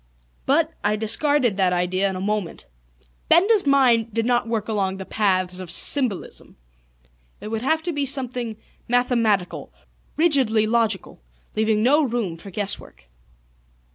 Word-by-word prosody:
But, 315 +4 +2
I 210 +1 +1
discarded 240 +1 +1
that 185 -2 +2
idea 185 +2 0
in 190 - -5
a - - -5
moment. 205 -3 -3 0.6
Benda's 390 +1 +4
mind 245 -5 +3
did 225 -1 0
not 240 -1 +1
work 225 -2 -3
along 195 -3 -2
the 190 - -8
paths 185 -4 -1
of 185 -2 -8
symbolism. 235 - 0 0.8
It 210 - -8
would 220 0 -3
have 315 +5 0
to 345 0 -3
be 285 -1 -1
something 250 -4 -1 0.3
mathematical, 235 -6 0 0.5
rigidly 265 -10 +3
logical, 220 - -1 0.3
leaving 215 0 +1
no 290 +6 +4
room 235 - -2
for 165 +4 -12
guess 200 +1 0
work. 65 -2 -17
225 Hz, 140 wpm, -22 LUFS, 195-260 Hz, 0.8 s, Benda's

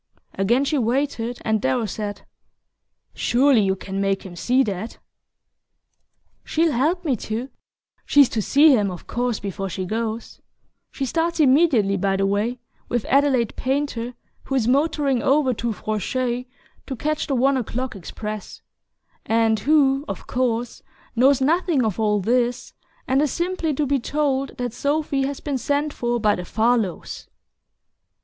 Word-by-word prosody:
Again 235 +8 +2
she 295 0 +1
waited, 245 -1 -1
and 220 -1 +1
Darrow 245 -3 +1
said: 205 0 -5 0.9
"Surely 255 -1 +3
you 190 -1 +1
can 195 +1 -5
make 195 -1 0
him 180 -2 -9
see 250 +9 +2
that." 210 0 -4 1.5
"She'll 325 0 +1
help 320 +8 0
me 275 -5 +2
to 225 +6 -4 0.5
she's 285 -2 +5
to 220 - -1
see 290 +8 +5
him, 205 -4 +1
of 180 -2 -8
course, 245 -2 -2
before 195 -1 -4
she 185 +1 -4
goes. 225 +3 -4 0.5
She 275 - -4
starts 330 +5 -1
immediately, 260 -9 +4
by 195 0 +1
the 195 - +1
way, 205 +5 0 0.3
with 240 -2 -1
Adelaide 270 -5 +2
Painter, 260 -3 -2 0.3
who 270 - -2
is 240 -4 +1
motoring 280 -1 +2
over 275 -1 +3
to 235 +1 -2
Francheuil 240 +5 -2 0.4
to 265 - -4
catch 305 +5 -2
the 275 - 0
one 270 +3 +3
o'clock 250 0 -3
express 210 +3 -7 0.6
and 225 -1 +2
who, 275 +2 +3
of - - -6
course, 245 -1 -1 0.3
knows 265 +3 +4
nothing 315 -2 +2
of 215 -1 -2
all 210 -1 +2
this, 240 +4 0 0.3
and 265 +2 +2
is 295 -3 +1
simply 345 -2 -1
to 295 - 0
be 280 0 +1
told 275 0 -1
that 245 -2 -3
Sophy 285 -1 0
has 280 -1 -5
been 280 -3 -3
sent 290 +4 -1
for 240 0 -1
by 210 -2 +3
the 180 - -4
Farlows." 220 -3 -1
245 Hz, 150 wpm, -22 LUFS, 220-280 Hz, 1.5 s, she's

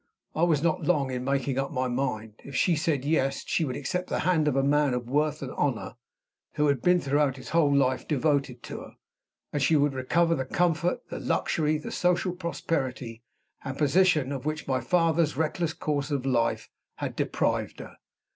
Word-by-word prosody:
I 155 - -2
was 165 -4 +3
not 165 -2 +1
long 145 -7 +1
in 125 -1 -3
making 135 0 0
up 135 - -2
my 130 -3 -1
mind. 110 -4 -2
If 140 - -9
she 175 +5 +3
said 150 -4 0
Yes, 140 -3 +1
she 165 - 0
would 130 -3 -3
accept 180 +6 -3
the - - -1
hand 165 -4 +2
of 145 - +1
a 135 - +2
man 145 -2 +2
of 120 -1 -4
worth 150 +3 0
and - - -5
honor, - - -1 0.6
who 150 - +1
had 140 -4 +1
been 180 0 +4
throughout 140 -2 +1
his 130 - -9
whole 160 -3 +3
life 130 -2 +2
devoted 140 -4 0
to - - -6
her; - - -12 0.6
and 145 - -1
she 160 - +3
would 145 -1 +3
recover 165 +6 +2
the 135 - -1
comfort, 170 +4 0
the - - -5
luxury, 155 -1 0
the 150 - -7
social 180 0 +1
prosperity 135 -9 -3 0.4
and 135 0 -5
position 150 -2 +3
of 135 -3 -4
which 155 +1 -3
my 130 -1 +1
father's 165 +1 +2
reckless 160 +1 0
course 145 -2 -2
of 140 -3 -2
life 120 -3 +1 0.3
had - - -4
deprived - - -1
her. - - -10
145 Hz, 195 wpm, -27 LUFS, 130-160 Hz, 0.6 s, been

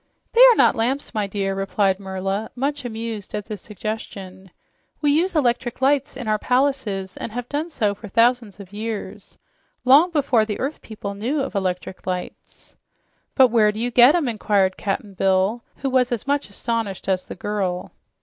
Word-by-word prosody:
"They 470 - +5
are - - +8
not - - +5
lamps, 250 +5 -1
my 210 -3 -1
dear," 195 -1 -2
replied 195 0 0
Merla, 195 +2 -3
much 280 +1 -2
amused 225 -3 -5
at 210 -1 -4
this 210 -4 -7
suggestion. 195 -2 -7 0.5
"We 295 -1 +2
use 345 +5 +1
electric 245 -4 0
lights 270 0 +1
in 250 -4 -6
our 215 0 +1
palaces 250 -8 0
and - - -5
have 245 +2 -5
done 300 +5 -3
so 215 -10 0
for 210 +2 -10
thousands 230 0 +2
of 200 -1 -12
years 220 0 -6 0.5
long 285 +8 +7
before 280 -8 +2
the 215 -1 -4
earth 280 +4 -3
people 210 -2 -7
knew 245 +9 -1
of 270 - -4
electric 185 -2 -3
lights." 180 -1 -6 0.6
"But 260 -2 +6
where 215 -2 +4
do 210 - -7
you 245 +2 -1
get 245 +6 +7
'em?" 330 -6 +1
inquired 205 -4 +1
Cap'n 205 +1 -3
Bill, 195 +4 +1
who 275 - -3
was 255 -1 +2
as 235 -4 -2
much 285 -3 -1
astonished 220 -2 -3
as 185 -1 0
the - - -7
girl. 190 -2 -3
220 Hz, 180 wpm, -22 LUFS, 195-255 Hz, 0.6 s, are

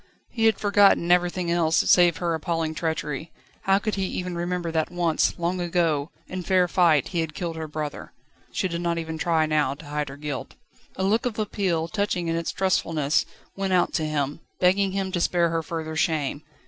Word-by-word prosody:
He 225 -2 0
had 220 -2 +4
forgotten 200 -4 +4
everything 180 0 +2
else 165 -2 +2
save 175 -4 +5
her 170 +1 -1
appalling 160 0 -1
treachery; 160 -1 -3 0.3
how 195 0 +4
could 215 +1 -2
he 195 -1 -1
even 180 -1 -4
remember 175 0 -2
that 160 -1 0
once, 175 -2 +1
long 175 +1 -1
ago, 165 -4 0 0.2
in 185 0 -5
fair 180 0 +3
fight, 165 -5 +3
he 175 - -2
had 160 -2 -2
killed 170 -2 -3
her 160 -1 -5
brother? 150 -1 -5 0.4
She - - -1
did 170 -1 -4
not 170 -1 0
even 160 -1 -4
try 160 -1 +2
now 150 -3 +1
to 150 - -13
hide 150 -1 -3
her 135 - -9
guilt. 145 -2 -5 0.4
A 190 - -2
look 220 +5 +2
of 225 - -5
appeal, 190 -6 -1
touching 185 -2 -1
in 165 - 0
its 165 0 -2
trustfulness, 165 -6 +1 0.3
went 195 -1 -1
out 180 -1 +2
to 160 - 0
him, 150 -1 -2 0.2
begging 190 +1 +3
him 195 -1 -2
to 175 -2 -1
spare 170 -1 +2
her 165 0 0
further 160 0 -5
shame. 150 -3 0
170 Hz, 200 wpm, -25 LUFS, 160-185 Hz, 0.4 s, save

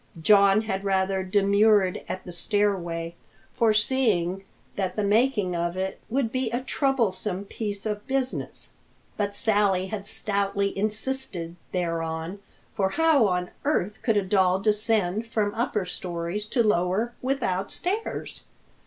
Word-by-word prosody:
John 200 +3 +5
had 195 -3 -3
rather 190 -1 +1
demurred 200 0 +3
at 185 - -4
the 180 - -8
stairway, 175 -3 0 0.4
foreseeing 215 -5 +2 0.3
that 190 -2 -2
the 210 - 0
making 210 -3 +2
of 170 +1 -2
it 190 0 -3
would 245 -1 0
be 255 -2 -1
a 240 +3 -2
troublesome 215 -8 0
piece 205 0 -5
of 210 -1 -3
business. 265 -1 -2 0.5
But 205 -1 -1
Sally 200 -3 +2
had 205 -1 -5
stoutly 200 -1 -1
insisted 210 -4 -2 0.2
thereon, 165 +1 -2 0.3
for 195 -1 +1
how 305 -2 +4
on 180 -1 -1
earth 220 -8 0
could 225 -3 +2
a 205 - +2
doll 185 -1 +3
descend 210 0 +1
from 210 -3 0
upper 220 -4 -1
stories 180 +3 -4
to 235 +2 +2
lower 210 +3 +1
without 200 -8 -1
stairs? 405 +5 -3
200 Hz, 130 wpm, -26 LUFS, 185-220 Hz, 0.5 s, John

